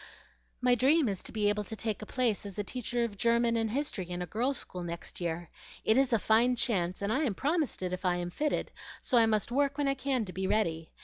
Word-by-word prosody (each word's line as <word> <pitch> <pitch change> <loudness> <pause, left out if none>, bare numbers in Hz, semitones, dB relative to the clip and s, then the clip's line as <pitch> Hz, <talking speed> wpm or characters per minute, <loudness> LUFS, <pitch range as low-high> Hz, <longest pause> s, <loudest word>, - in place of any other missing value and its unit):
"My 250 0 +4
dream 270 +4 +4
is 195 -3 -2
to - - -6
be 210 -2 +1
able 210 0 +1
to 220 - -6
take 220 -1 -2
a 215 - -7
place 245 -5 0
as 200 -2 -8
teacher 240 +1 -1
of 215 -3 -3
German 235 +1 +3
and 225 -1 +1
history 225 -8 -3
in 175 0 -4
a - - -4
girl's 240 +9 -1
school 180 - -5
next 170 +1 -6
year. 170 0 -3 0.3
It 220 - +5
is 270 0 +3
a 230 - +5
fine 230 +4 +3
chance, 190 -6 0
and 205 +2 +1
I 265 - +1
am 245 -10 0
promised 300 - -1
it 180 0 -2
if 185 - -4
I 180 -1 +2
am 175 0 -3
fitted; 300 +9 -1 0.3
so 245 - +4
I 225 - +5
must 215 +1 0
work 280 +2 +1
when 290 -1 +1
I 275 - +3
can 265 -3 -1
to 185 - -8
be 190 0 -2
ready. 165 -7 0
220 Hz, 250 wpm, -30 LUFS, 190-255 Hz, 0.3 s, It